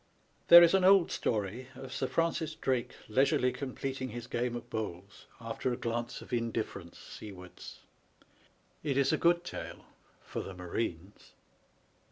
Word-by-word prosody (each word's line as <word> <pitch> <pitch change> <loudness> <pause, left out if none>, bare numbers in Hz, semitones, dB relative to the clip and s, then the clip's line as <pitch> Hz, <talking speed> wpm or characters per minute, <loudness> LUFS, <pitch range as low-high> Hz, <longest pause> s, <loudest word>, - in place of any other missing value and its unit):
There 170 0 +11
is 170 - +5
an 190 -1 +4
old 190 -1 +6
story 110 +3 -2
of 135 +1 -8
Sir 130 - -1
Francis 165 -1 0
Drake 130 -5 -1
leisurely 125 +2 +3
completing 135 -1 -4
his 120 0 -6
game 120 0 -2
of 120 0 -7
bowls, 100 -4 -6
after 115 +2 -3
a 120 - -2
glance 120 +1 -3
of - - -11
indifference 110 -7 -3
seawards. 90 -4 -11 1.0
It 140 -3 -1
is 140 - +3
a - - +3
good 170 0 +3
tale - - -7 0.4
for - - -5
the 95 - -8
marines. 90 +1 -5
120 Hz, 145 wpm, -31 LUFS, 110-135 Hz, 1.0 s, There